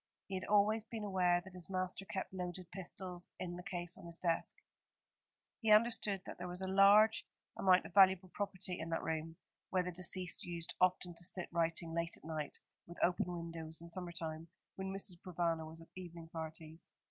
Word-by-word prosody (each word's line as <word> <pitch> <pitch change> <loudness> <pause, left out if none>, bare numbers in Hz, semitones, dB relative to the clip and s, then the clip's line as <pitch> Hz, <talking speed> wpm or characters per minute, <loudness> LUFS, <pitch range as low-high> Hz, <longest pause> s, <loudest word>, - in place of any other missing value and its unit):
He 195 - -8
had 185 0 -2
always 210 +1 +4
been 225 -1 -6
aware 180 -3 +3
that 190 +1 -13
his 180 -1 -5
master 185 +1 -1
kept 190 0 -4
loaded 180 -1 -5
pistols 180 -1 -5
in 175 -1 -4
the 180 - -6
case 175 -1 -2
on - - -10
his 170 0 -4
desk. 170 -2 0 1.1
He 220 -2 +3
understood 210 -3 +4
that - - -8
there 180 - -4
was 180 +1 -4
a - - -1
large 200 +3 +6 0.3
amount 185 -1 +5
of - - -9
valuable 190 -2 +6
property 190 -3 -2
in 160 - -4
that 165 - -1
room, 160 0 -2 0.3
where 185 -1 +2
the 180 - -3
deceased 180 0 +1
used 170 -1 -4
often 180 -1 +3
to 170 - -4
sit 185 +1 -1
writing 165 -1 +1
late 170 0 0
at - - -22
night, 155 -2 -3 0.3
with 170 - -10
open 180 - +3
windows 165 -2 -4
in 170 0 -10
summer 180 0 -4
time, 160 -1 -4 0.3
when 190 0 -4
Mrs. 195 -2 0
Provana 170 -3 -1
was 165 +1 -7
at 165 - -14
evening 170 -3 -8
parties. 160 0 -7
180 Hz, 195 wpm, -37 LUFS, 170-190 Hz, 1.1 s, large